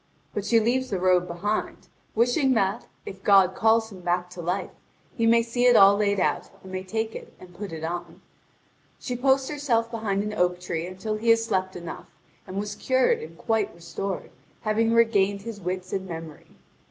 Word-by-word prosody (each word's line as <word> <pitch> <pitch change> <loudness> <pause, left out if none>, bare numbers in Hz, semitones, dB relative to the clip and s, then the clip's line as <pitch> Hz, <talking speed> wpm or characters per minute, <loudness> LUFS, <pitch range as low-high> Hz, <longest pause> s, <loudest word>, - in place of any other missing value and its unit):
But 205 - -3
she 230 +1 +4
leaves 255 +4 0
the 195 - -1
robe 180 -1 +3
behind, 195 +5 -3 0.3
wishing 250 +4 +3
that, 200 +2 0 0.2
if 195 0 -8
God 195 -2 +5
calls 225 +2 +2
him 185 -2 -11
back 180 0 -1
to 180 - -7
life, 180 +3 -2 0.4
he 230 -1 +1
may 230 0 +5
see 245 +2 +1
it 245 - +6
all 200 0 +8
laid 200 -1 +1
out, - - 0
and 190 - -10
may 185 0 -3
take 220 +3 -3
it - - -9
and 180 -1 -14
put 195 +1 -7
it 160 -1 -7
on. 175 +1 -5 0.8
She 250 -3 -4
posts 265 +1 +2
herself 250 -6 0
behind 210 -4 -1
an 210 0 -4
oak 180 -3 +1
tree 170 -1 -3
until 195 +4 -4
he 230 +2 -1
had 230 - +7
slept 190 -5 -1
enough, 170 -1 -8 0.4
and 185 - -6
was 205 +1 -3
cured 260 +2 +2
and 165 +1 -10
quite 220 -3 0
restored, 170 +3 -5 0.3
having 225 +1 +1
regained 205 -4 +3
his 225 -2 -7
wits 185 +1 -4
and 190 -1 -2
memory. 160 -2 -8
200 Hz, 190 wpm, -25 LUFS, 180-230 Hz, 0.8 s, all